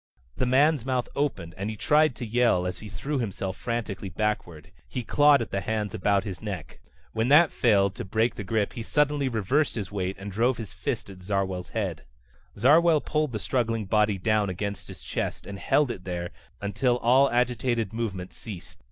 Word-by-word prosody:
The 130 - 0
man's 140 +1 +4
mouth 125 -1 -1
opened 95 - -2
and 100 +2 -2
he 110 - -4
tried 150 +4 +3
to 120 - -5
yell 115 -5 +2
as 90 -1 -3
he 105 - -9
threw 135 +9 -3
himself 95 -4 -3
frantically 115 -5 -4
backward. 90 -5 -3 0.2
He 125 - -4
clawed 145 +1 +5
at - - -10
the 95 - -1
hands 105 0 -2
about 100 -2 +1
his 95 -3 -6
neck. 100 -7 -6 0.3
When 110 +1 0
that 150 +4 +6
failed 100 -5 +3
to - - -4
break 110 +4 +1
the 105 - -6
grip 105 +1 0
he 115 - -5
suddenly 145 +2 +1
reversed 125 +7 +1
his 105 -4 -4
weight 95 -1 -2
and 100 +1 -7
drove 115 +5 +1
his 110 -4 -7
fist - - -3
at 95 -1 -13
Zarwell's 95 -2 -2
head. 95 -10 -3 0.5
Zarwell 155 +8 +5
pulled 150 -2 -1
the 110 - -2
struggling 115 -1 -1
body 105 0 +2
down 105 +1 +1
against 100 +2 -4
his - - -10
chest - - -3
and 100 -1 -7
held 145 +3 +2
it 90 - -7
there 90 -1 -4 0.3
until 115 +5 +1
all 130 +4 +4
agitated 120 -3 0
movement 100 -6 -4
ceased. 95 -6 -9
110 Hz, 190 wpm, -26 LUFS, 95-125 Hz, 0.5 s, that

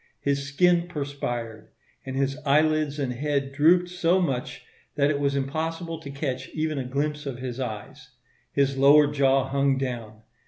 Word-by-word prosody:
His 140 0 -1
skin 175 +4 +3
perspired; 125 -8 -5 0.4
and 130 - -4
his 135 0 0
eyelids 155 0 +2
and 135 -4 -2
head 140 +1 -1
drooped 165 +6 +4
so 180 0 +1
much 135 -9 -2 0.3
that 145 0 +3
it 145 - -1
was 140 -1 0
impossible 160 +4 -3
to 145 - -9
catch 135 -2 -4
even 155 -2 -1
a - - -2
glimpse 145 +3 -2
of 130 -3 -4
his 125 0 -5
eyes. 130 +4 -6 0.4
His 140 -1 +1
lower 145 +2 +7
jaw 135 -2 +2
hung 140 0 +2
down. 115 -5 -5
140 Hz, 160 wpm, -25 LUFS, 135-150 Hz, 0.4 s, lower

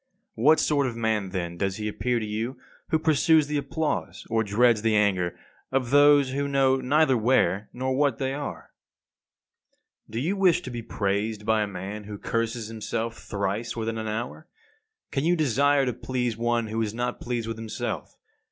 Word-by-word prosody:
What 150 +8 +4
sort 145 -3 +2
of 120 - -4
man 110 -4 0
then 85 -2 -4
does 95 +1 -1
he 105 +1 -4
appear 120 +3 -1
to 110 - -3
you 110 +5 -3 0.3
who 160 - +2
pursues 160 0 +4
the 150 +1 -2
applause 150 +3 -3
or 115 0 +2
dreads 110 +2 +3
the 110 -1 +2
anger 95 -4 +1 0.3
of 130 -2 0
those 145 -1 +6
who 140 +1 -1
know 135 -1 +3
neither 135 +2 +3
where 110 -3 +2
nor 130 +1 -2
what 140 0 +2
they 135 -1 -1
are? 145 0 -6 1.4
53. - - -18
Do - - -2
you 195 - +1
wish 185 -4 +4
to 130 - -7
be 120 -1 -4
praised 105 0 -2
by 110 0 +3
a 105 - 0
man 100 +2 -6
who 105 0 -7
curses 115 +1 -2
himself 115 +1 -3
thrice 100 +2 -3
within 115 -1 -2
an 110 - -4
hour? 120 +9 -4 0.6
Can 135 - -1
you 175 +2 +3
desire 145 -1 +3
to 125 - -1
please 125 -1 -2
one 120 0 0
who 110 +1 -2
is 110 -1 -2
not 125 +1 -3
pleased 120 -2 -3
with 115 -1 -4
himself? 110 -1 -5
115 Hz, 185 wpm, -26 LUFS, 110-135 Hz, 1.4 s, those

